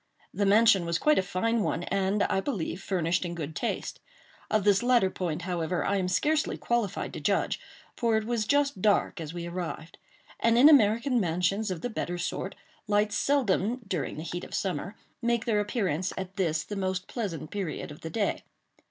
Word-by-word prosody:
The 200 -1 +1
mansion 205 -2 +5
was 170 0 +1
quite 300 - +3
a - - +4
fine 225 +5 0
one, 175 -4 -1
and, 195 +2 +1
I 190 - +1
believe, 195 - -3
furnished 175 -2 0
in 170 -1 -4
good 155 -2 -5
taste. - - -3 0.5
Of 215 -2 +2
this 200 -1 +4
latter 240 -6 +3
point, 170 -3 -3
however, 175 -2 -1
I 200 - +1
am 185 -2 0
scarcely 300 +12 +1
qualified 235 -5 -1
to - - -5
judge; - - 0 0.4
for 230 -3 +2
it 220 - -1
was 225 -2 -1
just 285 -6 +2
dark 200 -3 +2
as 155 -1 -5
we 170 0 -5
arrived; 170 -2 -6 0.4
and 230 0 +3
in 275 +5 +9
American 240 -1 +4
mansions 185 +3 0
of 180 -3 -4
the 245 - -2
better 175 -4 -3
sort 180 +2 -3 0.3
lights 210 0 +2
seldom, 245 -3 +1
during 175 -8 -3
the 155 - -5
heat 175 +1 -5
of - - -6
summer, 195 +1 -2 0.3
make 235 -1 +1
their 215 -3 +2
appearance 195 -5 -1
at 190 0 -5
this, 160 -6 0
the 205 - -6
most 185 -1 -2
pleasant 175 - -4
period 190 -7 -4
of 150 - -11
the 165 - -5
day. 210 +2 -1
195 Hz, 190 wpm, -28 LUFS, 175-225 Hz, 0.5 s, in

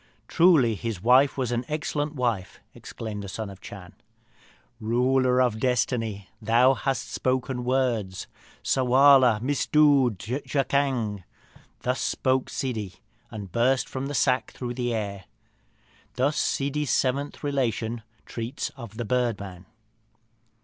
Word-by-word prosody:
"Truly, 160 -10 +4
his 110 -2 -4
wife 130 +4 +5
was 125 -3 -1
an 120 0 -1
excellent 150 -1 -2
wife!" 115 -8 -2
exclaimed 110 -2 -7
the 100 - -7
Son 105 +1 -5
of 95 - -13
the - - -27
Chan. 95 -3 -10 0.9
"Ruler 125 +3 +2
of 120 -4 +2
Destiny, 115 -5 -1
thou 120 +4 +4
hast 135 0 -2
spoken 130 -1 -1
words! 120 -7 -1 0.4
Ssarwala 130 -2 +5
missdood 140 -3 +3
jakzang!" 130 -2 -1 0.6
Thus 125 +1 -1
spake 130 0 0
Ssidi, 110 -8 -4 0.3
and 105 -5 -8
burst 125 +4 +2
from 130 +1 -4
the 145 - -4
sack 130 -2 +1
through 120 -1 -5
the 120 -1 -2
air. 100 -4 -4 0.9
Thus 140 +4 +1
Ssidi's 145 +1 -1
seventh 140 +4 0
relation 120 -5 -1 0.2
treats 120 +4 -4
of 115 -5 -11
the 120 - -3
Bird 120 -1 0
man. 95 -2 -9
125 Hz, 125 wpm, -26 LUFS, 110-135 Hz, 0.9 s, wife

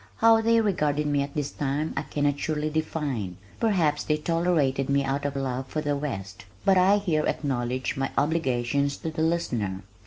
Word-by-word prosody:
How 225 0 +5
they 230 +1 +4
regarded 150 -8 +1
me 145 -1 +1
at 140 0 -5
that 145 -2 -3
time 145 +2 -1
I - - 0
cannot 145 -1 -1
surely 155 -1 -1
define 145 - -2 0.2
perhaps 170 -10 +2
they 150 - +1
tolerated 155 -5 +1
me 140 0 +3
out 135 +1 -2
of 145 -1 -2
love 130 -1 -2
for 155 - -3
the 145 -1 0
West. 95 -10 -5 0.2
But 190 -1 +5
I 195 +3 +5
here 165 -7 0
acknowledge 130 -3 -1
my 135 0 -1
obligation 140 -3 +1
to 160 +3 -5
"The 155 0 -3
Listener." 120 - -1
145 Hz, 180 wpm, -26 LUFS, 135-160 Hz, 0.2 s, How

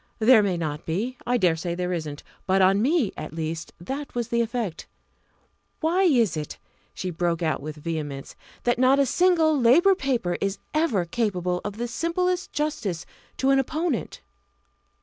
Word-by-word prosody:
There 225 0 +6
may 195 -4 0
not 155 -2 -4
be. 215 +10 -2
I 245 0 +3
dare 180 -7 +3
say 170 +1 -3
there 180 0 -2
isn't; 155 -4 -5 0.2
but 190 0 +3
on 190 +2 +4
me 275 - +2
at 155 0 -7
least 165 +1 -4
that 270 +12 -6
was 240 -1 -2
the 235 0 +2
effect. 230 -7 -3 0.9
Why 340 +4 +1
is 245 - +3
it" 150 -1 -5 0.4
she 185 - -3
broke 170 0 -1
out 155 -3 0
with 150 +1 -6
vehemence 150 -3 -5 0.3
"that 240 0 +1
not 260 +2 +5
a 280 - +4
single 330 +1 +3
Labour 320 +12 +6
paper 250 - -1
is 195 0 -1 0.2
ever 305 - +1
capable 180 -3 -1
of 205 0 -5
the 240 +1 -2
simplest 360 +7 -1
justice 230 - -2 0.3
to 265 +1 +2
an 270 - +4
opponent?" 305 0 -2
215 Hz, 170 wpm, -25 LUFS, 170-270 Hz, 0.9 s, There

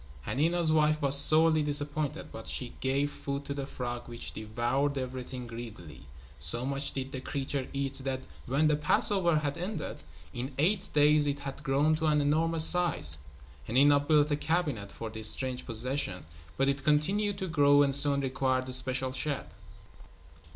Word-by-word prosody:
Hanina's 165 +3 +1
wife 155 0 +3
was 140 -2 +3
sorely 155 +2 +5
disappointed, 145 +1 -2
but 110 - -9
she 125 -2 -2
gave 140 +2 0
food 140 0 -5
to 140 - -4
the 140 -1 -5
frog 120 -3 -6
which 120 0 -6
devoured 120 +6 -2
everything 130 -1 -5
greedily. 105 - -10 0.3
So 80 - +2
much 140 +1 -2
did 135 0 -5
the 130 - -6
creature 135 -1 -3
eat 140 0 -3
that 130 -1 -3 0.3
when 140 +5 +1
the 155 -1 +3
Passover 170 +3 +3
had 145 -1 -2
ended, 190 +4 -5 0.4
in 130 +3 -6
eight 190 +6 +1
days 150 0 +4
it 140 0 -2
had 140 0 -7
grown 145 +2 +2
to 160 0 -1
an 150 -1 +3
enormous 160 +2 +3
size. 150 - +2 0.5
Hanina 140 +5 +4
built 150 0 +2
a 145 - +1
cabinet 150 - -2
for 115 -1 -7
his 110 -1 +1
strange 130 -1 -3
possession, 120 - -2 0.3
but 135 - +2
it 140 0 -1
continued 190 +8 +1
to 190 -1 -4
grow 145 -3 +4
and 140 -1 +1
soon 140 0 +4
required 130 -1 -1
a - - -1
special 130 0 0
shed. 140 +1 -3
140 Hz, 165 wpm, -29 LUFS, 130-150 Hz, 0.5 s, sorely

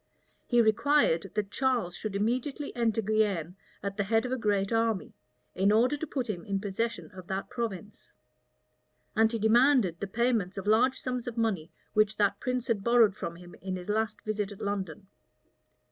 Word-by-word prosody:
He 240 -1 +4
required 220 - +3
that 205 -1 -1
Charles 245 -10 0
should 215 -2 -5
immediately 255 +7 -1
enter 225 -2 +1
Guienne 200 -5 0 0.3
at 200 0 -4
the 200 - 0
head 225 +3 +2
of 250 - -3
a - - +1
great 205 -4 0
army, 225 -5 0 0.4
in 195 +2 +2
order 240 +6 +4
to 315 +2 -5
put 260 -4 -3
him 180 -6 -4
in 200 -1 -2
possession 225 +3 -3
of 185 -1 -11
that 190 +1 -4
province; 210 -4 -6 1.0
and 220 0 +4
he 230 - -1
demanded 225 - +4
the 200 - -3
payments 225 -3 0
of 195 - -4
large 235 +5 +3
sums 250 -2 -3
of 240 -1 -5
money 200 -8 -1 0.2
which 215 0 +2
that 205 -1 +2
prince 250 -1 -2
had 225 -6 -1
borrowed 235 -3 +5
from 170 -5 -5
him 175 0 -13
in 190 0 -3
his 180 +1 -7
last 215 0 -1
visit 210 -1 -2
at 205 - -10
London. 200 -2 -4
215 Hz, 180 wpm, -29 LUFS, 195-235 Hz, 1.0 s, borrowed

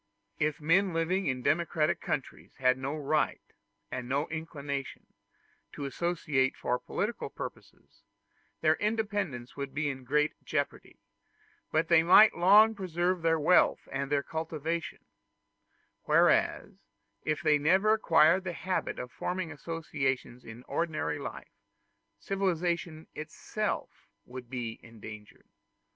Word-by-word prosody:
If 150 +1 0
men 170 +4 +2
living 180 +4 0
in 130 -2 -1
democratic 155 0 +1
countries - - -4
had 130 0 +3
no 135 +3 -4
right 150 +1 0 0.5
and 125 -1 -5
no 140 +4 0
inclination 145 -4 -5 0.7
to 145 - -5
associate 145 -3 0
for 125 0 -1
political 215 +4 -3
purposes, - - -10 0.6
their 155 -1 +5
independence 205 - -2
would 140 -1 -6
be 150 0 0
in 130 -1 -9
great 150 +4 +1
jeopardy; - - -3 0.7
but 160 +1 +1
they 170 -1 +6
might 190 +5 +7
long 210 +5 +6
preserve 180 -2 -1
their 165 0 +2
wealth 170 +5 +3
and 135 +1 -3
their 140 -1 +2
cultivation: 160 +1 -4 1.0
whereas - - +2 0.4
if 155 +1 -1
they 150 -2 +4
never 190 +8 +4
acquired 170 -3 +4
the 180 -2 -4
habit 185 +2 -2
of 125 - -6
forming 180 -2 -3
associations 135 -5 -3
in 115 +2 -11
ordinary 155 -2 -2
life, 140 - -8 0.6
civilization 175 -4 -2
itself 155 0 -4 0.2
would 125 -1 -9
be 120 -3 -5
endangered. 105 -2 -12
155 Hz, 120 wpm, -30 LUFS, 135-175 Hz, 1.0 s, might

